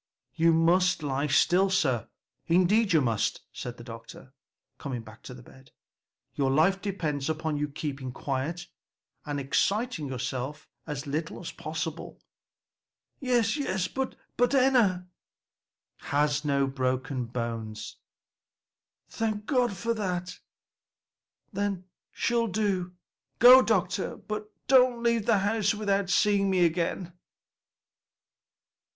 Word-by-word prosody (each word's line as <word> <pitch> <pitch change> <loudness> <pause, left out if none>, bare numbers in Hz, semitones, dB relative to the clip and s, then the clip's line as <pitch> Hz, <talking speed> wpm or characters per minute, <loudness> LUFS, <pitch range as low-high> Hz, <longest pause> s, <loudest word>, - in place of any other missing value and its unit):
"You 165 +1 +3
must 175 +1 +3
lie 140 +1 -1
still, 180 +7 +3
sir, 135 - +1 0.4
indeed 190 +5 +3
you 160 -3 +5
must," 115 -5 0
said 125 0 -6
the 120 - -10
doctor, 115 +3 -11 0.5
coming 125 -5 -5
back 110 +1 -14
to 125 - -10
the 125 - -13
bed; 130 +2 -17 0.6
"your 135 -2 0
life 170 +8 +3
depends 155 -9 -2
upon 160 -1 -2
your 150 0 -2
keeping 140 -3 -5
quiet 145 +7 -3 0.6
and 145 -1 -2
exciting 195 - 0
yourself 130 +2 -4 0.2
as 150 -2 -4
little 155 +3 -3
as 170 - -6
possible." 155 +1 -5 1.0
"Yes, 245 -4 +1
yes; 190 -11 -1
but 265 +4 -3 0.2
Enna?" 245 -8 +3 0.9
"Has 145 +1 0
no 140 -2 +2
bones 135 - -5
broken." 125 -4 -3 1.3
"Thank 215 -2 -3
God 245 -7 +1
for 230 +5 -1
that! 180 -4 -3 1.1
then 200 -2 -2 0.3
she'll 235 -1 0
do. 190 -3 -1 0.4
Go, 250 +2 +9
doctor, 190 -4 0
but 210 0 -6
don't 250 -2 +4
leave 235 -2 +1
the 230 -3 +4
house 205 +1 +1
without 200 -2 0
seeing 200 0 +3
me 185 -2 +3
again." 170 +1 -1
175 Hz, 115 wpm, -28 LUFS, 140-210 Hz, 1.3 s, Go